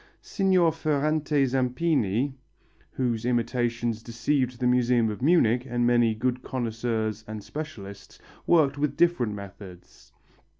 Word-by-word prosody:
Signor 185 -4 +2
Ferrante 150 -2 0
Zampini, 130 - 0 0.6
whose 120 -3 -1
imitations 120 -1 -1
deceived 125 +2 -1
the 125 - -1
museum 125 -2 +2
of 105 - -8
Munich 125 -6 +3
and 120 0 0
many 120 -2 +3
good 125 +3 -1
connoisseurs 115 -3 -3
and 110 -1 -7
specialists, 100 -11 -8 0.3
worked 145 -5 +3
with 145 -1 -1
different 130 -12 +2
methods. 100 -2 -12
120 Hz, 115 wpm, -26 LUFS, 115-145 Hz, 0.6 s, Munich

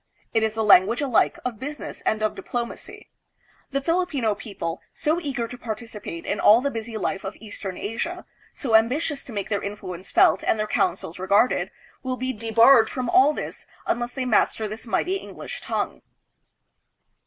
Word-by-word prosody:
It 225 - +3
is 220 0 0
the 220 - 0
language 210 +2 +6
alike 270 -6 +2
of 235 -4 -3
business 290 +2 -6
and 215 0 +1
of 215 - +1
diplomacy. 240 -1 -6 0.6
The 275 0 -1
Filipino 305 - +1
people, 200 -5 -5
so 320 +2 0
eager 275 -6 -2
to 245 +1 -9
participate 220 -7 -6
in 200 - -1
all 215 +3 +7
the 280 +2 -1
busy 225 -1 -5
life 195 -2 -2
of 195 +1 -5
eastern 205 -3 -7
Asia, 335 - -4 0.3
so 250 -6 -3
ambitious 270 +7 +3
to - - -9
make 205 -3 -4
their 200 -2 0
influence 190 -3 -6
felt - - +4
and - - +2
their 215 - 0
counsels 215 - -1
regarded, 200 +6 +3 0.3
will 255 -1 -3
be 255 +1 -2
debarred 230 +1 +5
from 250 -2 -3
all 275 +3 +6
this - - -6 0.2
unless 240 0 -1
they 260 -2 -2
master 220 -2 +2
this 215 +3 -8
mighty 370 - 0
English - - -8
tongue. - - -3
230 Hz, 170 wpm, -24 LUFS, 210-265 Hz, 0.6 s, all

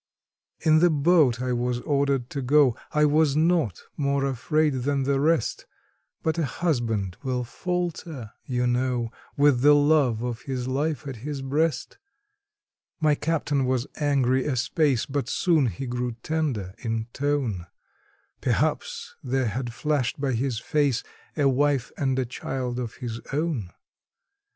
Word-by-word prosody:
In 155 0 +5
the 175 +2 +5
boat 145 -5 +3
I 125 -1 0
was 120 0 -1
ordered 140 -4 0
to 140 - -3
go 135 -2 +4 0.2
I 150 0 +3
was 150 -1 +3
not 160 - +1
more 140 -1 0
afraid 150 +3 +1
than 140 +1 0
the 135 0 +1
rest, 155 -3 +1 0.6
But 160 +1 0
a - - +2
husband 115 - -1
will 125 -2 -1
falter, 165 -5 -4
you 125 -1 0
know, 120 -1 0 0.3
with 140 -4 +4
the 145 +2 +7
love 145 -6 +3
of 120 -2 -3
his 130 -2 -4
life 145 +2 -1
at 135 -3 -5
his 140 +3 -5
breast; 150 - -1 1.0
My 155 -2 +4
captain 145 -3 0
was 130 -1 0
angry 130 -3 +2
a 140 - 0
space, 130 0 +1
but 140 -2 -2
soon 160 -8 +2
he 135 +4 -4
grew 125 -1 -2
tender 135 - -2
in 115 -2 -2
tone 135 -11 -1 0.7
Perhaps - - -1
there 130 -2 0
had 120 +3 -3
flashed 140 0 -1
by 140 -1 0
his 125 0 -1
face 140 +1 +1 0.3
a 145 -2 +3
wife 135 -1 +1
and 135 -2 0
a 130 - +1
child 125 0 -4
of 120 -3 -5
his 115 -2 -5
own. 145 - -1
135 Hz, 145 wpm, -25 LUFS, 125-150 Hz, 1.0 s, the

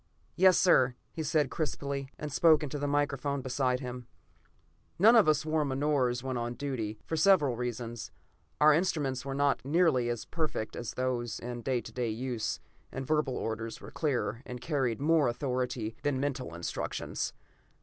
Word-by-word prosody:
"Yes, 185 0 +6
sir!" 130 -9 +4 0.2
he 165 - -5
said 150 -3 +1
crisply, 140 -3 -3
and 150 -2 -5
spoke 155 +3 +5
into 145 0 -4
the 145 - -1
microphone 140 -1 0
beside 130 -1 0
him. 125 -1 -6 0.9
None 220 +6 +7
of 220 -8 +6
us 155 0 +3
wore 155 0 +1
menores 135 -3 0
when 130 -1 -2
on 120 0 -3
duty, 120 -5 -3
for 160 - -2
several 155 -6 +4
reasons. 120 -4 -4 0.5
Our 150 0 +7
instruments 145 -6 0
were 135 0 -3
not 140 0 +1
nearly 140 -4 +3
as 120 -2 -3
perfect 155 -9 -3
as 120 -2 -5
those 125 -2 -1
in 120 0 -5
use 125 -3 +1
to 115 - -9
day, 120 +1 -3 0.5
and 135 0 -5
verbal 150 -3 +1
orders 115 0 -4
were - - -11
clearer 120 -7 -1
and 125 -2 -7
carried 130 -4 -1
more 155 0 +3
authority 125 -3 -2
than 145 -3 0
mental 135 -12 -3
instructions. 85 - -3
135 Hz, 160 wpm, -30 LUFS, 120-150 Hz, 0.9 s, None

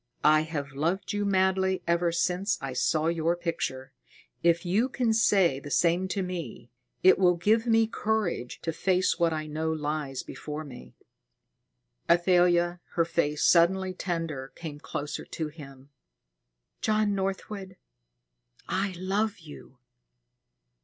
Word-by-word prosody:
I 155 0 +6
have 150 -4 -4
loved 165 +10 -2
you 205 0 -1
madly 190 -1 +1
ever 170 0 +1
since 180 +3 0
I 135 -1 -5
saw 155 +5 +1
your 165 0 +1
picture. 135 -6 -4 0.5
If 170 +1 +2
you 210 +9 +1
can 240 -3 0
say 195 -9 +3
the 145 - -9
same 175 +6 +2
to 195 0 -2
me, 175 -9 -6 0.3
it 185 - +6
will 180 -2 +4
give 220 +7 +2
me 225 -1 +4
courage 215 - -2
to 165 - -2
face 185 +2 +1
what 170 -1 +3
I 155 -1 -3
know 155 +1 -2
lies 150 -3 -3
before 150 +1 -7
me." 130 -5 -12 1.1
Athalia, 175 0 +3 0.2
her 165 - +3
face 155 -3 0
suddenly 185 +2 +4
tender, 165 -7 -4
came 155 -4 -7
closer 145 0 -5
to 160 -2 -5
him. 140 -3 -13 0.9
"John 215 -1 +1
Northwood, 195 0 -4 0.9
I 190 0 -1
love 200 +4 -1
you." 150 -5 -13
170 Hz, 135 wpm, -28 LUFS, 155-190 Hz, 1.1 s, I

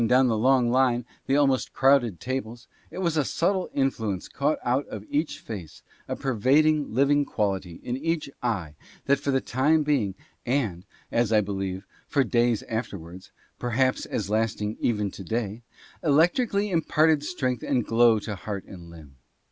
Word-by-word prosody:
13 115 - +2
down 130 +3 +5
the 115 -3 +2
long 125 +1 +3
line, 125 -2 +2 0.2
the 135 - +2
almost 135 -3 +2
crowded 130 -8 +3
tables, 120 -2 -5 0.2
it - - -10
was 170 -4 0
a 150 - +3
subtle 185 +6 0
influence 110 -9 -1
caught 145 +2 0
up - - -17
out 130 +4 +1
of 105 -2 -7
each 150 +2 -1
face, 95 -9 -9 0.2
a - - -2
pervading, 140 +4 +2
living 145 +2 +4
quality 95 -8 -2
in 125 - -2
each 160 +3 -1
eye, 100 -11 -2 0.3
that 140 0 +3
for 140 - -3
the 135 -1 +3
time 150 +6 +2
being 130 -11 0 0.3
(and, 115 -9 -1 0.2
as 115 -2 +1
I 110 -1 +5
believe, 95 -2 -4 0.2
for 140 - +2
days 120 -1 +1
afterwards 95 -6 -6
— - - -39
perhaps 130 +2 0
as 105 - -3
lasting 105 0 -1
even 105 -4 0
to 95 - -9
day) 110 +2 -3 0.4
electrically 195 - +2
imparted 160 -2 +3
strength 130 -8 -2
and 120 - 0
glow 115 0 +4
to 105 - -5
heart 100 0 -6
and 85 -3 -11
limb. 75 -5 -14
120 Hz, 170 wpm, -26 LUFS, 105-140 Hz, 0.4 s, down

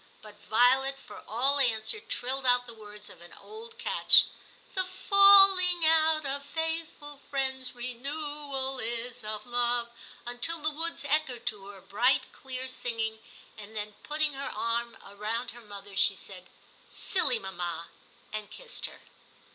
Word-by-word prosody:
But 210 -1 -13
Violet 265 +4 +3
for 320 - -12
all 270 +6 +2
answer 235 - +1
trilled 270 - -3
out 245 -1 +3
the 235 - -10
words 210 -1 -11
of - - -12
an 175 - -13
old 450 +1 -12
catch 480 +1 +5 0.2
— - - -27
The 375 - +2
falling 385 -2 +6
out 315 -1 +4
of 280 +1 -1
faithful 320 -2 -5
friends, 265 -2 -1
renewal 270 +2 -3
is 235 +1 -4
of 215 0 -5
love, 240 -1 +1 0.3
until 245 +8 +1
the 310 0 0
woods 325 0 -3
echoed 285 -5 0
to 200 -2 -4
her 200 -1 -11
bright 250 +7 +1
clear 260 -1 -5
singing; 225 -3 -3 0.4
and 215 +1 -12
then, 210 0 -5
putting 300 0 0
her 275 +1 -4
arm 235 +1 -2
round 210 +4 -4
her 240 - -13
mother, 200 -2 -10
she 195 0 +4
said, 185 -2 -9 0.3
* - - -29
Silly 275 - 0
mamma,' 175 -5 -5 0.4
and 215 -1 -5
kissed - - -5
her. - - -14
255 Hz, 150 wpm, -28 LUFS, 220-305 Hz, 0.4 s, falling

